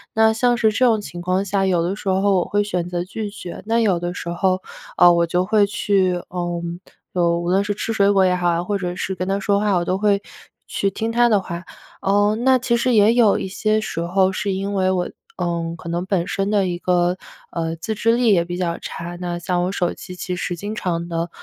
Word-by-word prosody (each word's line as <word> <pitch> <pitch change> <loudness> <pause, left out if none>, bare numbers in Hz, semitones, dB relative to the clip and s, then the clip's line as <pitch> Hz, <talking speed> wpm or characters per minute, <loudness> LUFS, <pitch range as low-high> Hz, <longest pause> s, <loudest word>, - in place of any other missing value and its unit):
那 220 0 +5
像 245 +2 +2
是 220 -2 +3
这 255 +5 +2
种 225 -3 +3
情 175 -3 -8
况 185 +2 0
下， 195 0 0
有 175 -3 +2
的 185 +3 -1
时 205 - -9
候 195 +1 +2
我 - - -1
会 205 0 +1
选 180 -4 -2
择 175 -1 -2
拒 210 +3 -5
绝， 200 -4 -8
那 230 +1 +1
有 195 -6 +2
的 175 0 -3
时 170 - -5
候， 185 +2 0 0.4
呃， 175 - +8
我 170 0 +3
就 180 +2 +1
会 210 0 +4
去， 195 -3 +1
呃， 175 -1 -3 0.5
嗯， 170 -1 +2
无 175 - -2
论 195 +2 +3
是 205 0 -2
吃 225 +2 -3
水 200 -1 +3
果 195 -1 +4
也 180 0 +3
好 175 -1 +1
呀， 170 +1 0
或 205 +3 -2
者 180 -1 -3
是 190 - -3
跟 185 +1 -3
她 195 +1 0
说 200 0 +1
话， 205 -1 +1
我 175 -1 0
都 185 - 0
会 205 -1 +2 0.5
去 200 - 0
听 225 +4 -3
她 240 0 +4
的 210 -2 +4
话。 170 -1 -6 0.4
呃， 205 +2 +2
那 260 +2 +4
其 240 -1 +1
实 250 +1 +1
也 210 +2 +5
有 235 -4 +4
一 - - -3
些 215 +3 0
时 165 - -4
候 190 +2 +2
是 200 +1 -2
因 195 +1 -2
为 185 -1 +1
我 180 -1 -1 0.3
嗯， 170 -2 -2
可 170 0 -9
能 175 +2 -2
本 190 -3 0
身 195 +1 -1
的 205 -3 +2
一 175 -1 -2
个， 180 0 +1 0.3
呃， 165 -1 -2
自 180 +7 -4
制 230 +2 +2
力 235 -3 +3
也 170 -2 +2
比 175 0 -5
较 170 -2 -1
差。 175 +1 -7
那 175 -1 -3
像 175 0 -1
我 185 - -1
手 180 -3 -1
机 180 -1 -10
其 180 0 -4
实 175 0 -3
经 205 +5 -5
常 170 -4 -2
地 165 +1 -2
190 Hz, 265 characters per minute, -21 LUFS, 175-205 Hz, 0.5 s, 呃